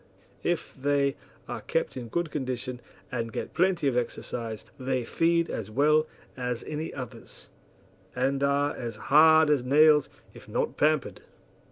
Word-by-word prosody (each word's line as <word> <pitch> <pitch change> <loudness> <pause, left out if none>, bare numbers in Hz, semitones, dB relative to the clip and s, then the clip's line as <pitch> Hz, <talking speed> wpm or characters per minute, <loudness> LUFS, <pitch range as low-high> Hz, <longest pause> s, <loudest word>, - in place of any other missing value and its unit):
If - - -2
they 140 0 +1 0.3
are - - -5
kept - - -1
in 125 -2 -6
good 170 +6 -2
condition 130 -3 -4 0.3
and 115 -2 -3
get - - -5
plenty 180 -3 +2
of 130 - +1
exercise 115 -2 -3
they 130 -1 -1
feed 170 +5 +2
as 110 -2 -5
well 150 +6 +3 0.3
as 125 -2 -3
any 155 +1 -4
others, 125 -4 -9 0.7
and 135 +2 0
are 140 +1 +1
as 115 -2 -5
hard 160 +5 +5
as 140 -4 +2
nails 150 +3 +5 0.2
if - - -14
not - - -1
pampered. 150 -2 +1
140 Hz, 145 wpm, -27 LUFS, 125-155 Hz, 0.7 s, hard